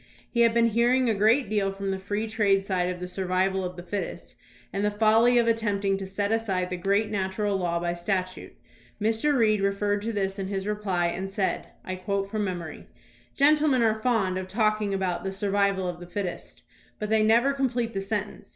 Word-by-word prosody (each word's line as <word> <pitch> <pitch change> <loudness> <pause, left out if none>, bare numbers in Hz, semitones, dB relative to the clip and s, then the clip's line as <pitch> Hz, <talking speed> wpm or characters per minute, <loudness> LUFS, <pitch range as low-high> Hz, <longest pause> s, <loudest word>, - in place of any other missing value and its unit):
We 235 - +2
had 230 -1 +4
been 230 0 +4
hearing 240 +3 +3
a 225 - +3
great 220 +5 +3
deal 200 -1 0
from 195 0 -4
the 190 - -3
free 205 +3 -2
trade 200 -3 +1
side 180 -2 0
of 180 -1 -4
the 180 - -5
"survival 190 +1 0
of 180 0 -4
the 175 - -8
fittest" 195 +2 -5 0.4
and 200 - -1
the 210 - +3
folly 225 +3 +4
of 235 - +4
attempting 205 -4 +1
to 195 - -5
set 200 +2 -2
aside 190 -5 -1
the - - -1
great 200 +4 0
natural 200 +1 -1
law 175 -3 0
by 175 0 -1
statute. 185 +1 -3 0.4
Mr. 225 +7 +1
Reed 215 -3 +3
referred 200 +1 0
to 225 +2 -2
this 195 -2 -2
in 190 - -3
his 195 -1 -3
reply 205 -4 -1
and 185 +3 -2
said 195 0 -2 0.2
(I 185 0 -4
quote 195 +1 -2
from 215 -1 -1
memory): 175 -4 -5 0.5
Gentlemen 290 -3 +4
are 220 -1 +1
fond 205 -7 +1
of 185 - -6
talking 215 0 +1
about 190 -3 -1
"the 190 - -2
survival 200 -1 0
of 175 -1 -5
the 175 - -10
fittest," 180 0 -5 0.3
but 210 - -4
they 220 0 +3
never 235 +6 +4
complete 250 -4 -1
the 195 - -2
sentence. 205 +1 -4
200 Hz, 205 wpm, -26 LUFS, 190-220 Hz, 0.5 s, had